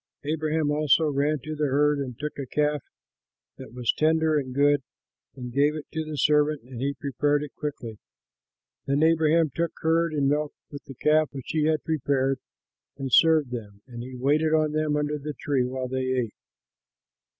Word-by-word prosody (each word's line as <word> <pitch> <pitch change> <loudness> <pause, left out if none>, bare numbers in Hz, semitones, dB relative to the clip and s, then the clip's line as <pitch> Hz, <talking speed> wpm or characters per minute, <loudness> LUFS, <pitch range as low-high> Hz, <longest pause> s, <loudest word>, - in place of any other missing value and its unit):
Abraham 155 0 0
also 150 +1 +3
ran 145 +2 +1
to 155 +1 -5
the 150 -1 0
herd, 145 +2 +2
and 130 -4 -5
took 150 0 -5
a 135 - -4
calf 150 +1 0 0.8
that - - -10
was 120 -1 0
tender 160 0 +2
and 135 -3 -1
good, 145 +1 +3 0.5
and 125 -2 -7
gave 145 +3 +3
it 155 - -6
to 160 -1 -2
the 155 -1 -6
servant, 150 -1 +2
and 125 -1 -9
he 140 +1 -1
prepared 145 +2 0
it 145 - -8
quickly. 120 -7 -6 0.9
Then 140 +2 +2
Abraham 160 -1 +3
took 170 0 -2
curd 165 0 +1
and 140 -2 +2
milk, 150 +1 0 0.2
with 145 - -9
the 135 - -10
calf 155 +3 +3
which 135 -3 -8
he 155 -1 +1
had 155 -1 +1
prepared, 135 -3 0 0.6
and 135 -3 -5
served 160 -5 +5
them; 105 -4 -7
and 120 -2 -9
he 130 +1 -8
waited 150 +5 +2
on 155 -1 +2
them 155 -1 0
under 150 0 -1
the 150 +1 -6
tree, 135 -4 0
while 130 0 -4
they 130 0 -2
ate. 125 -4 -1
145 Hz, 185 wpm, -26 LUFS, 135-155 Hz, 0.9 s, served